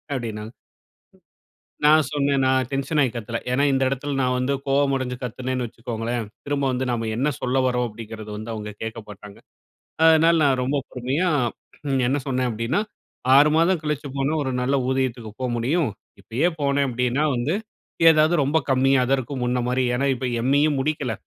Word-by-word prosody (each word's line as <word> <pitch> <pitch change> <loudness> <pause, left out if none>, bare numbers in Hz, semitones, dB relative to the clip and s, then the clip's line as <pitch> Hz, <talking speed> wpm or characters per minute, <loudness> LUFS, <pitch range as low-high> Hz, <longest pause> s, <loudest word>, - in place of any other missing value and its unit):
அப்டின்னாங்க. 110 -2 -5 1.3
நான் 155 -1 +6
சொன்னேன். 140 -2 +1
நான் 130 -1 +2
டென்ஷன் 140 +2 0
ஆயி 130 -4 +3
கத்தல. 115 0 -4
ஏன்னா, 140 +3 +2
இந்த 135 - +1
இடத்தில 135 +2 -3
நான் 125 -1 +1
வந்து 125 +2 0
கோபமடஞ்சு 135 -2 +1
கத்துனேன்னு 125 +1 -3
வச்சுக்கோங்களேன், 115 0 -4 0.2
திரும்ப 140 -1 -1
வந்து 125 +1 -1
நம்ம 115 -2 -2
என்ன 135 +5 +1
சொல்ல 130 +1 0
வரோம் 125 -1 +1
அப்டிங்கிறத 110 0 -9
வந்து 110 +2 -6
அவுங்க 105 -1 -5
கேட்க 110 +1 -5
மாட்டாங்க. 105 0 -11 0.7
அதனால 165 +1 +6
நான் 130 -3 +2
ரொம்ப 135 +3 0
பொறுமையா 135 +8 -1 0.6
ம் 135 -1 +1
என்ன 140 +3 +1
சொன்னேன் 130 -2 0
அப்டின்னா, 115 - -1 0.5
6 145 +2 +7
மாதம் 170 +1 +3
கழிச்சு 150 -1 -3
போனா, 135 +2 0
ஒரு 130 - -2
நல்ல 135 +3 0
ஊதியத்துக்கு 130 -4 -1
போ - - -2
முடியும். 140 +4 0 0.3
இப்பயே 120 - 0
போனேன் 140 0 +1
அப்டின்னா 125 +4 0
வந்து, 135 +9 0 0.5
ஏதாவது 155 +1 +5
ரொம்ப 145 +4 +2
கம்மியா 135 0 +3
தான் 135 - +3
இருக்கும். 130 0 -5
முன்னமாரி 125 +1 0
ஏன்னா, 135 +3 0
இப்ப 130 +1 -4 0.2
எம்.இயும் 145 +2 +2
முடிக்கல. 140 -5 -1
130 Hz, 160 wpm, -23 LUFS, 120-140 Hz, 1.3 s, 6